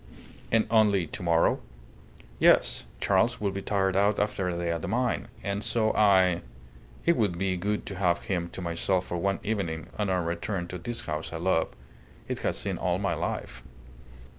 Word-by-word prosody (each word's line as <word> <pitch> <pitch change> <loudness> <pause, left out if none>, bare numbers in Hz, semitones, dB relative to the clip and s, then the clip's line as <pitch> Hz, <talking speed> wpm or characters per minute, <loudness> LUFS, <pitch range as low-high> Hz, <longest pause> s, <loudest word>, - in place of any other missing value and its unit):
"And 115 -1 +4
only 105 -5 +4
to 80 - -7
morrow?" 85 -2 +3 0.8
"Yes. - - +4
Charles - - +2
would 100 -2 -1
be 100 - -3
tired 95 -1 0
out 100 +1 +3
after 105 -3 0
a 85 - -2
day 85 -1 -1
at 85 -1 -2
the - - -4
mine, 125 +1 0 0.2
and 100 +1 -2
so 110 0 +1
I 95 -4 +4 0.6
It 170 - +5
would 100 - +1
be 95 0 0
good 105 +4 -2
to 100 - -6
have 90 -3 +1
him 90 -3 -1
to 95 - -7
myself 90 +2 0
for 90 - -3
one 95 +3 0
evening 90 -7 -2
on 105 -2 +1
our 90 -2 +1
return 85 +2 -3
to 90 - -5
this 120 +6 -3
house 75 0 -4
I 80 - -4
love. 80 -1 +1 0.6
It - - -3
has - - -1
seen - - -2
all - - +1
my - - 0
life." - - -4
95 Hz, 190 wpm, -28 LUFS, 85-105 Hz, 0.8 s, It